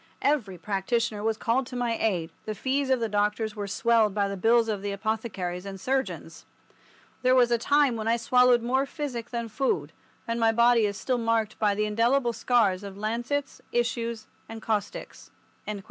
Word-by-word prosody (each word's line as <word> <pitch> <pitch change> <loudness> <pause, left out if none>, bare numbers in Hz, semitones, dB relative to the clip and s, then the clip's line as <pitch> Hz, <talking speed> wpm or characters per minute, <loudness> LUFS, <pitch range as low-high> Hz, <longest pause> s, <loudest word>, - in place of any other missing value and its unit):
Every 235 -11 +1
practitioner 210 +4 -1
was 220 0 0
called 240 +3 0
to 250 - -8
my 240 -2 0
aid, 180 -8 -1 0.2
the 215 - -3
fees 270 +4 -1
of 260 -1 +3
the 230 - 0
doctors 210 +1 0
were 205 -1 -4
swelled 220 0 +2
by 200 -1 +1
the 200 - -4
bills 225 +4 +3
of 210 -3 -2
the 200 0 -3
apothecaries 200 -4 -3
and 195 -1 -7
surgeons. 265 +6 -3 0.8
There 255 0 +4
was 245 -2 +4
a 235 - +3
time 285 0 +3
when 220 -1 -4
I 230 +1 +3
swallowed 250 0 +4
more 265 +3 +1
physic 250 -6 -5
than 235 -1 -3
food, 225 +5 -1 0.4
and 230 0 -1
my 225 -1 +4
body 235 -1 +4
is 200 -1 -4
still 255 -2 -1
marked 225 -2 0
by 205 -2 +2
the 210 +1 0
indelible 235 +4 +2
scars 220 -5 +2
of 200 -1 -8
lancets, 240 +7 -3
issues, 235 -1 -1 0.2
and 225 - -7
caustics." 210 -2 -4
230 Hz, 180 wpm, -27 LUFS, 210-245 Hz, 0.8 s, There